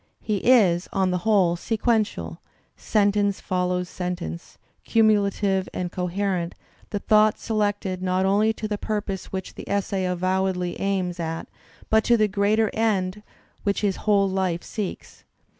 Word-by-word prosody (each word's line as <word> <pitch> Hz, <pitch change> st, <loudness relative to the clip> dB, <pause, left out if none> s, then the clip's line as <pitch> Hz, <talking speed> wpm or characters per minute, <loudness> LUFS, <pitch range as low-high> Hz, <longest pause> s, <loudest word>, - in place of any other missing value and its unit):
He 210 Hz, -2 st, -1 dB
is, 195 Hz, -7 st, +4 dB
on 190 Hz, -1 st, +1 dB
the 180 Hz, -, 0 dB
whole, 185 Hz, -5 st, +4 dB
sequential; 210 Hz, -, -1 dB, 0.4 s
sentence 205 Hz, -1 st, +1 dB
follows 180 Hz, 0 st, -1 dB
sentence, 180 Hz, -, -5 dB, 0.3 s
cumulative 200 Hz, -3 st, +2 dB
and 180 Hz, -1 st, -3 dB
coherent, 180 Hz, -1 st, -2 dB, 0.3 s
the 205 Hz, -, -2 dB
thought 215 Hz, +1 st, +4 dB
selected 205 Hz, -4 st, -1 dB
not 185 Hz, 0 st, +1 dB
only 205 Hz, +3 st, +3 dB
to 220 Hz, -, -5 dB
the 210 Hz, -1 st, -3 dB
pur 215 Hz, -1 st, -1 dB
pose 195 Hz, -2 st, -5 dB
which 190 Hz, -1 st, -6 dB
the -, -, -10 dB
essay 200 Hz, -1 st, -1 dB
avowedly 185 Hz, 0 st, -1 dB
aims 185 Hz, -3 st, -1 dB
at 165 Hz, 0 st, -4 dB, 0.4 s
but 220 Hz, 0 st, +5 dB
to 235 Hz, -, +4 dB
the 215 Hz, -1 st, +3 dB
greater 210 Hz, +2 st, +1 dB
end 210 Hz, -3 st, 0 dB, 0.4 s
which 200 Hz, -1 st, 0 dB
his 200 Hz, -3 st, 0 dB
whole 200 Hz, -2 st, +2 dB
life 190 Hz, -3 st, -1 dB
seeks. 210 Hz, -4 st, -6 dB
195 Hz, 140 wpm, -24 LUFS, 180-210 Hz, 0.4 s, but